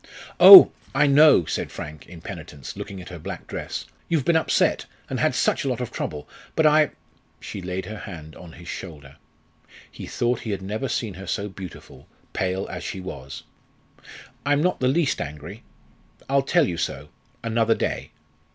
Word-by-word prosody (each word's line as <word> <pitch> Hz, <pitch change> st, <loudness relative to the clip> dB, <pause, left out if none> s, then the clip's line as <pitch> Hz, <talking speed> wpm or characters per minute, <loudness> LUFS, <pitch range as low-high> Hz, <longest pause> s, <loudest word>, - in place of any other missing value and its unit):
"Oh! 385 Hz, -2 st, +12 dB, 0.2 s
I -, -, +4 dB
know," 145 Hz, -, +6 dB
said -, -, -3 dB
Frank, 75 Hz, 0 st, -9 dB
in 85 Hz, -2 st, -12 dB
penitence, 70 Hz, -3 st, -9 dB
looking 95 Hz, -, -7 dB
at -, -, -11 dB
her 90 Hz, -2 st, -9 dB
black -, -, -7 dB
dress; -, -, -6 dB, 0.2 s
"you've 160 Hz, -6 st, 0 dB
been 170 Hz, -, +3 dB
upset, 160 Hz, -, +1 dB, 0.2 s
and -, -, -2 dB
had -, -, +1 dB
such -, -, +1 dB
a -, -, -3 dB
lot 125 Hz, -2 st, -2 dB
of 125 Hz, -, -4 dB
trouble. 75 Hz, -2 st, -5 dB, 0.3 s
But 160 Hz, -, +2 dB
I 155 Hz, 0 st, +5 dB, 0.3 s
" -, -, -38 dB
She 100 Hz, -, -7 dB
laid 90 Hz, +1 st, -4 dB
her 110 Hz, +1 st, -7 dB
hand 80 Hz, -6 st, -10 dB
on 85 Hz, -2 st, -12 dB
his 85 Hz, 0 st, -13 dB
shoulder. 75 Hz, -7 st, -9 dB, 0.7 s
He -, -, -9 dB
thought 120 Hz, 0 st, -1 dB
he 115 Hz, -, -7 dB
had 100 Hz, -2 st, -3 dB
never 110 Hz, +7 st, -3 dB
seen 110 Hz, -5 st, -2 dB
her 95 Hz, +2 st, -10 dB
so 105 Hz, -1 st, -2 dB
beautiful, 95 Hz, -3 st, -11 dB, 0.3 s
pale 95 Hz, +1 st, -1 dB
as -, -, -7 dB
she 95 Hz, -, -5 dB
was. 70 Hz, -8 st, -8 dB, 1.0 s
"I'm 145 Hz, +1 st, +2 dB
not 180 Hz, -, 0 dB
the 125 Hz, -, +1 dB
least 145 Hz, +2 st, +1 dB
angry. 75 Hz, +9 st, -8 dB, 0.7 s
I'll 140 Hz, +1 st, +2 dB
tell 150 Hz, +2 st, +2 dB
you 85 Hz, -, -3 dB
so 70 Hz, 0 st, -4 dB, 0.3 s
another 115 Hz, 0 st, +1 dB
day. -, -, -3 dB
100 Hz, 180 wpm, -23 LUFS, 85-135 Hz, 1.0 s, Oh